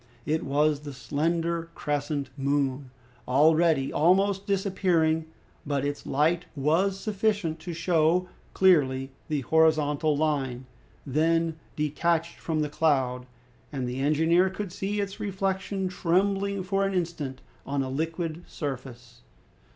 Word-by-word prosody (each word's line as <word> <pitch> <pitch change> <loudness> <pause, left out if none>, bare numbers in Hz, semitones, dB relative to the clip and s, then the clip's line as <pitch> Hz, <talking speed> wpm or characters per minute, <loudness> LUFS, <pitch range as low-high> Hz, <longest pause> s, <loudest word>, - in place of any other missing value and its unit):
It 155 +1 0
was 145 +1 +2
the 145 -1 -8
slender 165 +4 -1
crescent 145 -2 -2
moon, 140 -1 -1 0.4
already 155 +1 +3
almost 195 +5 +3
disappearing; 180 -5 +1 0.4
but 140 -1 -1
its 145 0 -4
light 160 +5 +1
was 170 +8 +1
sufficient 205 -6 -1
to 175 +2 -6
show 170 +1 +2 0.3
clearly 135 -8 +3 0.2
the 150 -3 -1
horizontal 155 0 +2
line, 135 -5 -1 0.4
then 160 +3 +1 0.2
detached 165 +2 0
from 160 -2 -1
the 150 - 0
cloud, 130 -5 +1 0.4
and 130 -4 -3
the 125 +2 -4
engineer 160 +6 +3
could 190 0 -5
see 200 +2 -2
its 200 -1 -3
reflection 195 0 -2
trembling 195 +2 0
for 195 +1 0
an 195 -1 0
instant 160 -7 -3 0.2
on 140 -1 -1
a 130 - -4
liquid 165 +3 -3
surface. 125 -4 -7
160 Hz, 120 wpm, -27 LUFS, 145-180 Hz, 0.4 s, already